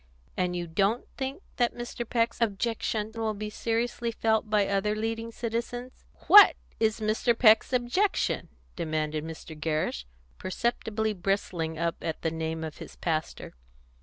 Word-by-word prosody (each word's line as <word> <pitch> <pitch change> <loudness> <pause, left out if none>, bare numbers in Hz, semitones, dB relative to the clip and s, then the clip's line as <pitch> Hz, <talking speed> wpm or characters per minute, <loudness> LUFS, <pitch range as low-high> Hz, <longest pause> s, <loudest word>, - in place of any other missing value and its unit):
And 180 -1 0
you 175 -1 -2
don't 195 +8 0
think 270 +6 -4
that 240 -1 +1
Mr. 240 -1 -5
Peck's 230 0 0
objection 220 0 -1
will 225 -1 -2
be 210 +1 -5
seriously 235 +1 -1
felt 220 -1 +1
by 210 -2 +3
other 200 +1 +1
leading 225 +1 -3
citizens?" 240 +2 -4 0.2
"What 415 0 +10 0.2
is 220 -1 +2
Mr. 220 +2 +1
Peck's 220 0 +6
objection?" 255 +12 +1 0.3
demanded 155 -2 -2
Mr. 160 0 -8
Gerrish, 155 - -2 0.3
perceptibly 220 +2 -1
bristling 175 -4 -2
up 170 +1 -1
at 160 -2 -4
the 160 - +1
name 160 0 -3
of 155 -1 -6
his - - -9
pastor. 160 -2 -3
215 Hz, 140 wpm, -28 LUFS, 170-230 Hz, 0.3 s, What